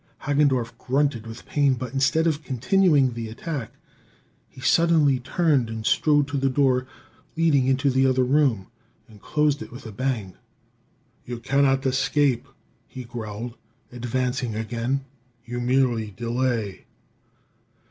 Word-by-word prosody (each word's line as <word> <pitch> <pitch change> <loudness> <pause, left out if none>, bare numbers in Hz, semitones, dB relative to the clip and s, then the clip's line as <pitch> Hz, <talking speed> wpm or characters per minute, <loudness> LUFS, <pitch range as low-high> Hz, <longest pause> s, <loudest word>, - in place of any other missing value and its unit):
Hagendorff 140 -4 +1
grunted 130 -4 0
with 115 +2 -10
pain; 140 -3 +2
but 125 0 -6
instead 140 +4 +2
of 155 -2 0
continuing 140 0 +2
the 115 -1 -5
attack, 130 +1 -5 0.8
he 135 - -16
suddenly 150 0 +3
turned 140 -2 +1
and 110 -1 -6
strode 145 +1 +3
to 145 - -2
the 135 0 +1
door 130 -1 +2 0.5
leading 150 -6 +3
into 135 +1 +2
the 130 +1 +3
other 130 0 +2
room, 130 -7 +2 0.4
and 105 -3 -17
closed 150 +4 +1
it - - -8
with 125 +2 -11
a 110 - -7
bang. 115 -5 -3 0.9
"You 120 -1 -6
cannot 135 +2 +1
escape," 135 -1 +1 0.4
he 130 - -8
growled, 115 0 -7 0.3
advancing 125 0 -2
again; 120 +5 -2 0.4
"you 120 +1 -4
merely 120 -3 +1
delay." 115 -2 -2
130 Hz, 130 wpm, -24 LUFS, 120-140 Hz, 0.9 s, suddenly